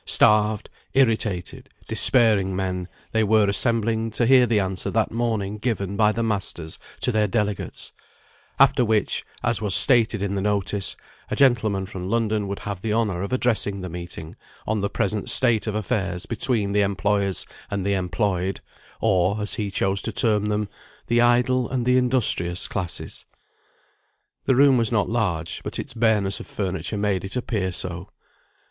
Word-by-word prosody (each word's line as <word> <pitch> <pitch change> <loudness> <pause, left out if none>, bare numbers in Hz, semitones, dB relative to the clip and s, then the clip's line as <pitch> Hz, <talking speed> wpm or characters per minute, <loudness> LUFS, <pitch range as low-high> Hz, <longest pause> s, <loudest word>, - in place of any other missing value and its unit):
Starved, 105 0 +3 0.3
irritated, 110 -8 0 0.2
despairing 105 -7 +4
men, 90 -1 -3 0.2
they 110 0 +2
were 110 0 +3
assembling 115 +1 0
to 115 +2 0
hear 125 0 +5
the 110 -2 +2
answer 95 0 -2
that 110 +2 0
morning 110 -3 -2
given 100 -4 -2
by 105 0 +3
the 115 +2 -2
masters 95 -7 -4 0.2
to 125 - +3
their 110 -2 +1
delegates; 105 -1 -3 0.7
after - - +4
which, 110 -3 0 0.2
as 120 -4 0
was 105 -2 +2
stated 115 -4 +5
in 100 0 -2
the 100 - -2
notice, 100 -1 -1 0.3
a - - -2
gentleman 110 -8 +2
from 95 -2 -8
London 105 +1 -1
would 100 0 -4
have 100 -3 -5
the 110 - -2
honour 105 -5 0
of 100 - -4
addressing 115 -6 0
the 90 - -6
meeting 85 -2 -7 0.3
on 110 -1 -1
the 100 - -1
present 105 -1 -2
state 120 -4 +2
of 105 - -2
affairs 95 -3 -2
between 110 -3 0
the 105 +1 +2
employers 100 0 0 0.2
and 100 -2 -3
the 100 - +1
employed, 95 0 -1 0.4
or 100 -1 +2
(as 105 0 -1
he 105 -3 -2
chose 95 0 0
to - - -3
term 105 -3 +2
them) 105 0 -1 0.4
the 120 0 +2
idle 125 +1 +2
and 125 -2 -2
the 125 0 +3
industrious 120 -9 +2
classes. 90 -3 -4 1.2
The 130 - +3
room 135 0 +5
was 115 -1 +1
not 105 -3 +1
large, 90 -8 -2
but - - -5
its - - -6
bareness 110 -4 +1
of - - -9
furniture 95 0 -3
made 100 -2 -1
it 95 +4 -5
appear 110 -7 -2
so. 90 0 -4
105 Hz, 165 wpm, -23 LUFS, 95-115 Hz, 1.2 s, hear